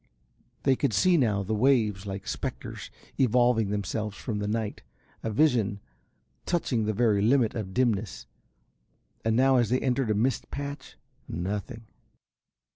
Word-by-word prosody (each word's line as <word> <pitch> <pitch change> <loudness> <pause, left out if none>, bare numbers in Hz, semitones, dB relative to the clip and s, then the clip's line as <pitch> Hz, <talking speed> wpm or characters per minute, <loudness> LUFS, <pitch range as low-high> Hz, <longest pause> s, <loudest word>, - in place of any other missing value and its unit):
They 135 -1 +4
could 115 - 0
see, 185 - +4
now, 110 -10 +2
the 105 +3 -2
waves 105 -4 +2
like 95 0 -5
spectres - - -5 0.3
evolving 120 -3 +3
themselves 105 +1 -3
from 110 -5 -4
the 105 - -2
night, 110 0 -2 0.4
a 115 - -3
vision 110 -5 +2 0.7
touching 125 -10 0
the 110 - +1
very 110 -2 +2
limit 115 +1 +3
of 105 -5 -4
dimness, 110 -3 0 1.0
and 110 0 +1
now 130 +2 +4
as 120 -4 +2
they 125 +2 +2
entered 130 -2 0
a 105 - +2
mist 120 +4 0
patch 140 0 -6 0.3
nothing. 105 +6 -4
110 Hz, 140 wpm, -27 LUFS, 105-125 Hz, 1.0 s, They